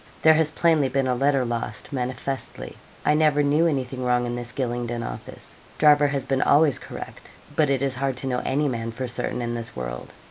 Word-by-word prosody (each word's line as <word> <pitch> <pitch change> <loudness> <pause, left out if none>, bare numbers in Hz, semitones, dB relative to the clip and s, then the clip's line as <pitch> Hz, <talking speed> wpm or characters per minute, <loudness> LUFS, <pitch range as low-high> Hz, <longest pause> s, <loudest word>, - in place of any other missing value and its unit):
'There 160 - +8
has 155 -1 +2
plainly 160 -3 +2
been 135 +1 0
a 130 - +1
letter 135 +1 +2
lost, 120 +4 -4
manifestly. 130 +1 -4 0.3
I 150 - +4
never 150 -1 +3
knew 150 +4 +3
anything 130 -4 -2
wrong 125 -1 +2
in 120 0 -3
this 120 0 -5
Gylingden 120 -2 -3
office. - - -10 0.2
Driver 150 -1 +6
has 140 -2 -2
been 135 -1 0
always 145 -1 +4
correct; - - -9 0.2
but 150 -2 +3
it 135 -1 +1
is 135 -2 0
hard 135 0 -2
to 135 - -4
know 125 -1 0
any 145 +3 +1
man 115 -3 -3
for 125 +3 -4
certain 125 0 -2
in 120 0 -2
this 115 -1 -5
world. - - -6
130 Hz, 205 wpm, -24 LUFS, 120-145 Hz, 0.3 s, There